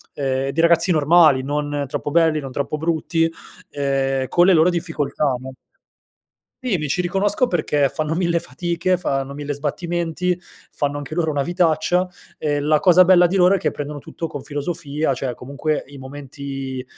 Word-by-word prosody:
ehm, 135 -1 -1
dei 165 +4 0
ragazzi 170 +2 +4
normali, 155 -3 +5
non 145 0 -2
troppo 145 +1 -4
belli 160 -1 +3
non 135 -2 -7
troppo 140 +3 -2
brutti, 165 +1 0 0.4
ehm, 135 -1 -1
con 175 0 +4
le 190 - +6
loro 165 +1 +5
difficoltà 155 -5 -1
no? 130 +1 -9 1.1
Sì, 245 -6 0
mi 150 - -3
ci 180 +6 0
riconosco 195 +7 +1
perché 150 - +1
fanno 155 +4 -3
1000 170 -1 +1
fatiche, 170 +6 -1
fanno 140 -5 -2
1000 145 0 -4
sbattimenti, 170 +4 -2 0.3
fanno 145 0 -2
anche 145 +1 -7
loro 165 -1 0
una 145 -2 0
vitaccia, 175 +2 +1 0.3
e 145 -1 0
la 150 +1 +2
cosa 180 +1 +6
bella 180 -1 +6
di 185 - -2
loro 180 0 +5
è - - +3
che - - 0
prendono 145 0 -6
tutto 165 - -7
con 145 -3 -6
filosofia. 145 0 -2
Cioè 125 -1 -4
comunque 140 +4 -3
i 140 0 -12
momenti, 135 -1 -6
150 Hz, 170 wpm, -21 LUFS, 140-175 Hz, 1.1 s, le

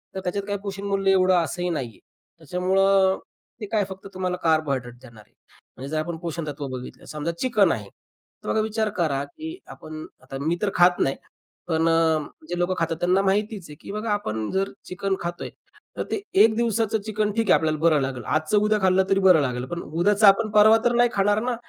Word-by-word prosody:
तर - - -2
त्याच्यात 190 +2 -2
काही 205 0 -1
पोषणमूल्य 195 -1 -1
एवढं 185 -1 +4
असंही 180 +2 -3
नाहीये. 125 - -4 0.4
त्याच्यामुळं 190 +3 +2 0.4
ते - - -3
काय 215 -2 +2
फक्त 190 +1 -9
तुम्हाला 185 -1 -2
कार्बोहायड्रेट 140 -7 0
देणार 115 -4 -14
आहे. - - -35 0.4
म्हणजे 135 +2 -7
जर 155 - 0
आपण 165 +1 -4
पोषणतत्व 155 -4 -5
बघितलं, 130 -1 -8
समजा 155 +2 -4
चिकन 215 -8 +3
आहे, 105 -2 -3 0.6
तर - - -9
मग - - +1
आता 220 - +2
विचार 220 0 -1
करा, 145 -6 0
की 320 - -8
आपण 155 0 -9 0.2
आता, 135 - -7
मी 165 +4 0
तर 210 - +1
खात 180 0 +4
नाही, 135 - +1 0.5
पण 165 -1 +1
अ, 165 -1 +3 0.3
जे 175 - -3
लोकं 175 +1 +1
खातात, 165 0 -1
त्यांना 180 +2 +3
माहितीच 200 -1 -1
आहे, 150 - -10
की - - -8
बघा, 215 +2 -4
आपण 110 - -3
जर 195 +1 -1
चिकन 195 +1 -2
खातोय, 175 0 -5 0.5
तर - - -1
ते 405 - -1 0.2
1 220 -1 +4
दिवसाचं 225 -2 0
चिकन 215 -1 -1
ठीक 225 -2 -1
आहे, - - +6
आपल्याला 155 -1 0
बरं 160 -2 +3
लागेल, 130 -2 -3
आजचं 155 - 0
उद्या 210 +1 +2
खाल्लं 190 0 +4
तरी 195 - +3
बरं 185 -5 +6
लागेल. 125 -2 -2
पण 170 +6 -5
उद्याचा 200 +6 +2
आपण 215 +3 +5
परवा 215 +1 +6
तर 240 - +3
नाही 240 0 +4
खाणार 205 +1 +2
ना. 250 0 -1
185 Hz, 200 wpm, -24 LUFS, 155-205 Hz, 0.6 s, आहे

